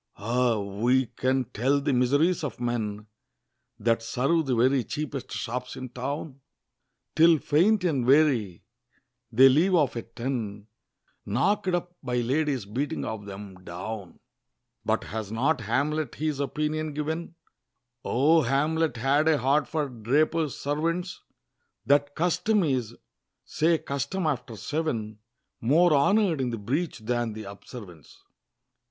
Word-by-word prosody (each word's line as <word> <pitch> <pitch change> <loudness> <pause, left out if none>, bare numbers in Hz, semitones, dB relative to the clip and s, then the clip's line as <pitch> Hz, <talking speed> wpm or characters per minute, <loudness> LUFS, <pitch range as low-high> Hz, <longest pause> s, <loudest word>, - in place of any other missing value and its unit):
Ah! 120 +2 +1
who 110 +6 +1
can 130 0 +1
tell 130 +5 +1
the 140 0 0
miseries 145 +8 +2
of 140 -6 -4
men 110 -4 -2 0.7
That 115 -1 +1
serve 135 +7 0
the 130 - +1
very 130 +2 +3
cheapest 145 0 -5
shops 125 +2 -4
in 130 -1 -7
town? 140 +3 -5 0.7
Till 165 +1 +6
faint 180 +8 +2
and 150 -8 +1
weary, 130 - +3 0.7
they 130 +4 +7
leave 165 +8 +4
off 145 -7 +2
at 115 0 -7
ten, 115 -5 -4 0.6
Knock'd 185 - +1
up 175 0 -4
by 125 -3 -3
ladies 135 0 0
beating 130 +8 -3
of 105 -2 -5
'em 95 -2 -10
down! 95 +2 -7 0.6
But - - 0
has 110 -2 -5
not 130 +5 +1
Hamlet 145 +8 -1
his 150 -2 -2
opinion 150 +1 -2
given 160 +3 -3 0.7
O 155 +6 +3
Hamlet 150 +2 +1
had 140 +6 +2
a 160 -2 +4
heart 140 +2 +2
for 155 0 -1
Drapers' 140 +6 0
servants! 165 +5 -2 0.6
"That 145 +2 +2
custom 190 +5 +1
is" 125 -7 -1 0.5
say 165 +1 +2
custom 140 +7 -3
after 130 -5 -2
seven 110 -4 -3 0.4
"More 160 +8 +4
honor'd 175 +1 +3
in 125 - 0
the 115 - -3
breach 140 - -2
than 120 0 -2
the 110 0 -7
observance." 100 - -11
135 Hz, 130 wpm, -27 LUFS, 115-155 Hz, 0.7 s, they